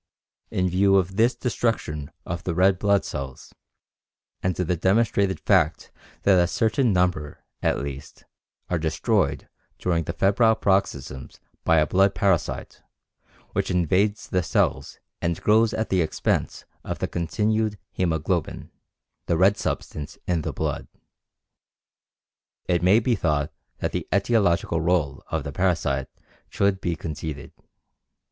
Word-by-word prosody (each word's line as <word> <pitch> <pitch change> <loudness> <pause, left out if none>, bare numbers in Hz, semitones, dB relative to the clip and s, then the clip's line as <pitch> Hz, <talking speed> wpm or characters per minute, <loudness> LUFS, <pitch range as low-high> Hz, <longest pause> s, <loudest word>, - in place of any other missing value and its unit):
In 90 0 0
view 95 +2 +3
of 95 0 +1
this 115 +3 +3
destruction 115 - -2 0.2
of 85 0 -4
the 85 - -2
red 95 +1 +4
blood 100 -1 +2
cells 65 -2 -7 0.9
and 90 -1 0
the 90 0 0
demonstrated 100 +1 +2
fact 85 -6 +1 0.3
that 95 -3 +5
a - - +1
certain 115 +5 +1
number, 90 -5 0 0.2
at - - +1
least, 70 -1 -7 0.4
are 90 - -1
destroyed 80 0 0 0.3
during 85 -3 0
the 85 - -3
febrile 100 +5 +3
paroxysms 95 -10 -1 0.2
by 80 - +4
a 75 - +4
blood 95 +4 +3
parasite, 95 -5 0 0.7
which - - -1
invades 95 +5 +1
the 90 - +1
cells - - 0 0.2
and 85 0 -1
grows 110 +1 +4
at 110 - -2
the 95 -2 +2
expense 80 - -1 0.2
of - - -4
the - - -2
continued 105 +6 0 0.2
hæmoglobin 85 -1 -1 0.6
[the 85 - +2
red 95 +4 +5
substance 75 -6 -4
in 85 -3 0
the - - -3
blood], - - -3 1.8
it 85 -2 +1
may 95 +5 +5
be 120 +1 +1
thought 75 -7 0 0.2
that - - -2
the - - -3
etiological 100 -5 +2
rôle 80 -5 0
of - - -2
the 70 - -5
parasite 75 -6 0 0.4
should 100 -1 +1
be 85 -1 -1
conceded. 80 -2 -6
90 Hz, 135 wpm, -24 LUFS, 80-100 Hz, 1.8 s, that